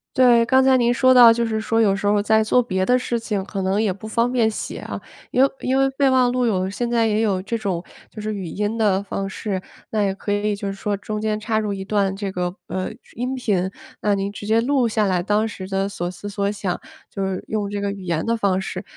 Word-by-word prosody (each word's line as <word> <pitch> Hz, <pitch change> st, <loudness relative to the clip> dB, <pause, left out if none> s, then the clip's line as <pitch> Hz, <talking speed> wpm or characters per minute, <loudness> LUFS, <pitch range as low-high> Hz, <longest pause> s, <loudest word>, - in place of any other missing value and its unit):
对， 240 Hz, -2 st, +5 dB
刚 260 Hz, +2 st, +4 dB
才 265 Hz, 0 st, +5 dB
您 240 Hz, -1 st, +3 dB
说 255 Hz, +1 st, +5 dB
到 240 Hz, -2 st, +9 dB
就 235 Hz, +1 st, +1 dB
是 220 Hz, -1 st, -1 dB
说 225 Hz, +1 st, 0 dB
有 200 Hz, -3 st, +4 dB
时 195 Hz, +1 st, -4 dB
候 205 Hz, 0 st, +3 dB
在 220 Hz, +1 st, +3 dB
做 250 Hz, +3 st, +3 dB
别 190 Hz, -5 st, -1 dB
的 250 Hz, 0 st, +3 dB
事 240 Hz, -1 st, -1 dB
情， 215 Hz, -3 st, -2 dB
可 195 Hz, -, -4 dB
能 190 Hz, +3 st, +1 dB
也 200 Hz, -4 st, +1 dB
不 210 Hz, +3 st, -12 dB
方 230 Hz, +2 st, +1 dB
便 235 Hz, -3 st, +2 dB
写 -, -, -5 dB
啊， -, -, -6 dB, 0.3 s
因 255 Hz, -, +3 dB
为 275 Hz, -, +5 dB
因 260 Hz, +1 st, +1 dB
为 270 Hz, 0 st, +3 dB
备 270 Hz, 0 st, +2 dB
忘 255 Hz, -1 st, +4 dB
录 250 Hz, -1 st, +1 dB
有 190 Hz, -4 st, 0 dB
现 235 Hz, +4 st, -3 dB
在 230 Hz, -1 st, +3 dB
也 215 Hz, 0 st, +1 dB
有 195 Hz, -4 st, +1 dB
这 230 Hz, +4 st, -3 dB
种 195 Hz, -6 st, -2 dB, 0.3 s
就 215 Hz, -, -9 dB
是 215 Hz, 0 st, -3 dB
语 195 Hz, -, -5 dB
音 205 Hz, +6 st, -2 dB
的 200 Hz, -4 st, +2 dB
方 195 Hz, 0 st, -4 dB
式。 190 Hz, -1 st, -3 dB, 0.3 s
那 215 Hz, -1 st, +1 dB
也 195 Hz, -1 st, +1 dB
可 205 Hz, +1 st, -3 dB
以 205 Hz, +1 st, 0 dB
就 200 Hz, 0 st, -4 dB
是 195 Hz, -, -2 dB
说 200 Hz, +1 st, -2 dB
中 210 Hz, +1 st, -5 dB
间 215 Hz, -1 st, -1 dB
插 220 Hz, 0 st, 0 dB
入 210 Hz, -2 st, -2 dB
一 195 Hz, 0 st, -5 dB
段 200 Hz, -2 st, +1 dB
这 195 Hz, 0 st, -4 dB
个， 180 Hz, -1 st, -2 dB
呃， 185 Hz, 0 st, -3 dB, 0.3 s
音 250 Hz, +2 st, -2 dB
频， 190 Hz, -7 st, 0 dB, 0.3 s
那 210 Hz, -, +2 dB
您 195 Hz, 0 st, -1 dB
直 205 Hz, -, -8 dB
接 220 Hz, +2 st, +3 dB
录 255 Hz, +1 st, +2 dB
下 215 Hz, -2 st, +1 dB
来 180 Hz, -2 st, +1 dB
当 210 Hz, +2 st, +1 dB
时 190 Hz, -3 st, -7 dB
的 195 Hz, 0 st, 0 dB
所 175 Hz, -2 st, -4 dB
思 180 Hz, +3 st, -9 dB
所 200 Hz, 0 st, -1 dB
想， 200 Hz, -3 st, -3 dB, 0.3 s
就 195 Hz, -, -4 dB
是 190 Hz, -1 st, -2 dB
用 210 Hz, -2 st, -2 dB
这 205 Hz, -, -2 dB
个 200 Hz, -, -1 dB
语 195 Hz, -, -9 dB
言 170 Hz, -3 st, -1 dB
的 230 Hz, 0 st, +1 dB
方 200 Hz, -4 st, +1 dB
式， 185 Hz, 0 st, -5 dB
210 Hz, 280 characters per minute, -22 LUFS, 195-230 Hz, 0.3 s, 到